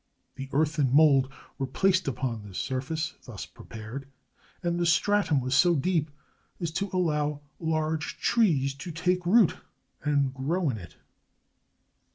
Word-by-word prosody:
The 135 Hz, 0 st, -7 dB
earth 155 Hz, +2 st, +1 dB
and 135 Hz, -4 st, +3 dB
mould 135 Hz, -2 st, +5 dB, 0.3 s
were 135 Hz, -, -1 dB
placed 185 Hz, +6 st, +2 dB
upon 125 Hz, -4 st, -2 dB
this 100 Hz, -3 st, -9 dB
surface, 145 Hz, +4 st, -2 dB
thus 115 Hz, -6 st, -7 dB
prepared, 115 Hz, +5 st, -9 dB, 0.6 s
and 175 Hz, 0 st, 0 dB
the 175 Hz, -, +1 dB
stratum 170 Hz, -2 st, +3 dB
was 130 Hz, +1 st, -2 dB
so 170 Hz, +5 st, +5 dB
deep 160 Hz, 0 st, +1 dB, 0.5 s
as 170 Hz, -2 st, -2 dB
to 195 Hz, +4 st, -2 dB
allow 150 Hz, -5 st, 0 dB, 0.2 s
large 160 Hz, -1 st, -1 dB
trees 150 Hz, -, +2 dB
to 135 Hz, +6 st, -8 dB
take 180 Hz, +2 st, 0 dB
root 215 Hz, -1 st, +5 dB, 0.5 s
and 140 Hz, -3 st, +1 dB
grow 150 Hz, +4 st, 0 dB
in 110 Hz, -, -5 dB
it. 90 Hz, -, -12 dB
150 Hz, 145 wpm, -28 LUFS, 135-170 Hz, 0.6 s, mould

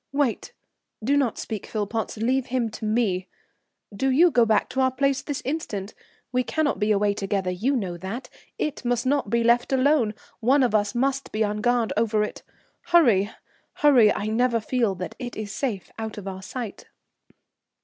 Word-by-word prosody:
"Wait, 280 Hz, -4 st, 0 dB, 0.5 s
do 275 Hz, +6 st, +2 dB
not 270 Hz, -6 st, +1 dB
speak, 215 Hz, -3 st, -5 dB
Philpotts, 220 Hz, +1 st, -3 dB
leave 250 Hz, +4 st, 0 dB
him 240 Hz, -3 st, -1 dB
to 215 Hz, -, -6 dB
me.... 210 Hz, -5 st, 0 dB, 0.7 s
Do 265 Hz, +7 st, +1 dB
you 330 Hz, +7 st, +5 dB
go 235 Hz, -4 st, +4 dB
back 215 Hz, -2 st, +2 dB
to 265 Hz, -, -1 dB
our 260 Hz, -, +4 dB
place 275 Hz, +1 st, 0 dB
this 290 Hz, -2 st, -5 dB
instant; 220 Hz, -9 st, -3 dB, 0.4 s
we 250 Hz, 0 st, +1 dB
cannot 310 Hz, +2 st, 0 dB
be 210 Hz, 0 st, +1 dB
away 205 Hz, 0 st, +2 dB
together, 195 Hz, -2 st, -1 dB
you 230 Hz, +10 st, 0 dB
know 185 Hz, -8 st, -2 dB
that; 195 Hz, +9 st, -6 dB, 0.3 s
it 300 Hz, -3 st, -3 dB
must 245 Hz, 0 st, 0 dB
not 275 Hz, -5 st, +1 dB
be 235 Hz, +1 st, +2 dB
left 235 Hz, +2 st, +3 dB
alone, 260 Hz, -5 st, +3 dB, 0.2 s
one 260 Hz, +4 st, +4 dB
of 245 Hz, -, +1 dB
us 205 Hz, +1 st, +1 dB
must 270 Hz, +2 st, 0 dB
be 215 Hz, +1 st, +1 dB
on 210 Hz, 0 st, -1 dB
guard 240 Hz, -1 st, +1 dB
over 215 Hz, -1 st, +2 dB
it. 210 Hz, -, -5 dB, 0.5 s
Hurry, 235 Hz, -, +4 dB, 0.4 s
hurry, 255 Hz, -8 st, +5 dB
I 205 Hz, -, -2 dB
never 230 Hz, +2 st, +2 dB
feel 225 Hz, -3 st, 0 dB
that 180 Hz, 0 st, -6 dB
it 245 Hz, -2 st, -6 dB
is 210 Hz, -1 st, -5 dB
safe 215 Hz, -6 st, -3 dB
out 220 Hz, -1 st, -5 dB
of 200 Hz, -2 st, -7 dB
our 190 Hz, -1 st, -5 dB
sight. 225 Hz, +2 st, -7 dB
230 Hz, 180 wpm, -25 LUFS, 210-260 Hz, 0.7 s, you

